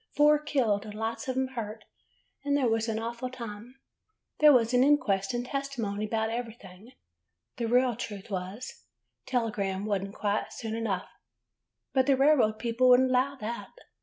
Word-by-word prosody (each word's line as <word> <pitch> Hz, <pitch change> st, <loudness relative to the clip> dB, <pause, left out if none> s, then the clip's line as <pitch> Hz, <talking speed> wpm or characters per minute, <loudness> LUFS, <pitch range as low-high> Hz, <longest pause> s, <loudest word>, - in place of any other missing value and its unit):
Four 295 Hz, 0 st, +5 dB
killed, 255 Hz, -9 st, 0 dB
and 210 Hz, -1 st, -9 dB
lots 225 Hz, +2 st, -3 dB
of 260 Hz, 0 st, -2 dB
'em 260 Hz, 0 st, 0 dB
hurt, 220 Hz, -4 st, -6 dB, 0.6 s
and 285 Hz, 0 st, +1 dB
there 265 Hz, -3 st, +2 dB
was 225 Hz, 0 st, +1 dB
an 220 Hz, -, -1 dB
awful 235 Hz, +3 st, -4 dB
time! 235 Hz, -1 st, -8 dB, 0.6 s
There 300 Hz, 0 st, +8 dB
was 240 Hz, -3 st, +3 dB
an 250 Hz, +1 st, +5 dB
inquest 210 Hz, -10 st, +2 dB
and 240 Hz, 0 st, -2 dB
tes 275 Hz, +1 st, -3 dB
timony 215 Hz, -5 st, -3 dB
'bout 220 Hz, 0 st, 0 dB
everything. 225 Hz, -2 st, -7 dB, 0.6 s
The 235 Hz, -2 st, -1 dB
real 245 Hz, 0 st, +3 dB
truth 210 Hz, -3 st, -7 dB
was 190 Hz, +6 st, -5 dB, 0.2 s
— -, -, -54 dB
telegram 210 Hz, -6 st, -1 dB
was 200 Hz, -3 st, 0 dB
n't 195 Hz, +1 st, -7 dB
quite 205 Hz, 0 st, -1 dB
soon 225 Hz, -2 st, -5 dB
enough; 220 Hz, -5 st, -2 dB, 0.9 s
but 260 Hz, 0 st, +3 dB
the 275 Hz, -2 st, +4 dB
railroad 270 Hz, -6 st, +4 dB
people 235 Hz, +2 st, +2 dB
would 250 Hz, 0 st, +7 dB
n't 260 Hz, -, +2 dB
allow 260 Hz, +2 st, +2 dB
that. 230 Hz, +3 st, -5 dB
230 Hz, 175 wpm, -28 LUFS, 215-255 Hz, 0.9 s, There